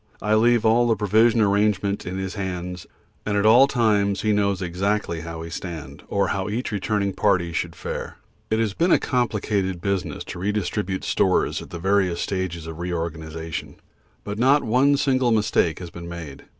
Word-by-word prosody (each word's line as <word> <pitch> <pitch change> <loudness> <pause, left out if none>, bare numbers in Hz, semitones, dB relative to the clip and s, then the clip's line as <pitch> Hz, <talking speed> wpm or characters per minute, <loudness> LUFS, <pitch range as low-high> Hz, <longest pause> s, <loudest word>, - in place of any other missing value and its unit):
I 105 +1 0
leave 115 +1 +4
all 120 +2 +4
the 115 - +3
provision 110 +3 +3
arrangement 100 -1 +1
in 90 +1 -4
his 95 0 -4
hands, 90 -3 -5 0.4
and 105 -1 -1
at 100 - +1
all 120 +5 +7
times 105 -6 +1
he 110 - +1
knows 100 -2 +1
exactly 95 -1 -1
how 85 0 -7
we 80 0 -7
stand, 80 -6 -7
or 100 -2 0
how 95 0 -2
each 115 +4 -3
returning 100 -1 -1
party 90 -5 +1
should 85 0 -2
fare. - - -6 0.3
It 110 - +1
has 110 -3 0
been 170 - +1
a - - +7
complicated 105 -6 -1
business 100 +1 -2
to - - -8
redistribute 95 -1 -2
stores 95 -1 +1
at - - -11
various 90 0 0
stages 95 -4 -3
of 80 0 -8
re 90 +1 -3
organisation, 80 -1 -5 0.5
but 105 +1 -5
not 135 +4 +4
one 130 +5 +3
single 130 -3 +2
mistake 105 -6 +2
has 85 -2 -8
been 85 0 -8
made. 80 -5 -8
100 Hz, 175 wpm, -23 LUFS, 85-110 Hz, 0.5 s, all